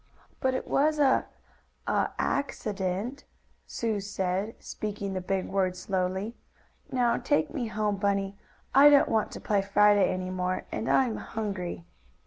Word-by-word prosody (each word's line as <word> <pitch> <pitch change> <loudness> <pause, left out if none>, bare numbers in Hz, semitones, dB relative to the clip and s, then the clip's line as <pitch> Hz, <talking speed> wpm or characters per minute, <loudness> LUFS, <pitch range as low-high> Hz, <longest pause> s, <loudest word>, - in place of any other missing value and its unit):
"But 260 0 +1
it - - -3
was 305 +2 +2
a 275 -3 +3 0.6
a - - +1
accident," 210 -2 -2 0.4
Sue 225 -3 -2
said, 195 +1 -2
speaking 205 -2 -5
the 185 - -2
big 190 +1 -1
word 185 -2 0
slowly. 190 +4 -2 0.6
"Now 240 -2 +2
take 290 +5 0
me 255 -7 -2
home, 210 -1 -1
Bunny. 200 0 0 0.4
I 280 +2 +9
don't 285 -1 +5
want 220 -1 +1
to - - -6
play 205 -2 +1
Friday 205 +1 +4
any 185 0 -3
more, 185 0 -2
and 225 - -3
I'm 250 -4 +3
hungry." 185 - -4
205 Hz, 140 wpm, -28 LUFS, 190-240 Hz, 0.6 s, I